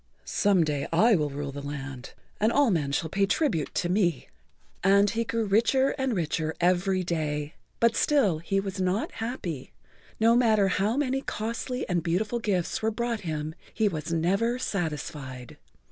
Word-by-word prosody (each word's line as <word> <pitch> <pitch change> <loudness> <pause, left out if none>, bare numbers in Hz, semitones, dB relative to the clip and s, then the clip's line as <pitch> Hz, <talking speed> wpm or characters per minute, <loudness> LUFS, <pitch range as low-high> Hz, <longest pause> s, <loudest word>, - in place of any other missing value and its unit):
"Some 195 -4 +3
day 150 -3 -1
I 215 +7 +5
will 150 -4 0
rule 140 0 -5
the 145 +1 -7
land 140 -2 -7 0.3
and 215 +2 +3
all 280 -4 +4
men 150 -6 0
shall 160 - 0
pay 195 +4 +1
tribute 195 - 0
to 175 - 0
me." 180 -2 0 0.5
And 200 +2 +5
he 230 0 0
grew 230 0 -1
richer 235 +6 +3
and 265 -3 -1
richer 160 -2 -1
every 185 +1 +2
day. 150 -3 -2 0.3
But 230 -1 +3
still 215 - +2
he 195 +4 0
was 195 -1 -4
not 185 +4 0
happy. 190 - -5 0.5
No 230 +1 +5
matter 220 -5 +4
how 205 +6 +1
many 270 -2 0
costly 235 +2 -3
and 175 -2 0
beautiful 205 +8 -1
gifts 190 -6 -1
were 220 - +2
brought 235 0 -2
him, 155 -3 -3 0.2
he 220 - +1
was 160 -3 -3
never 195 +9 +1
satisfied. 150 - -4
190 Hz, 165 wpm, -27 LUFS, 160-225 Hz, 0.5 s, I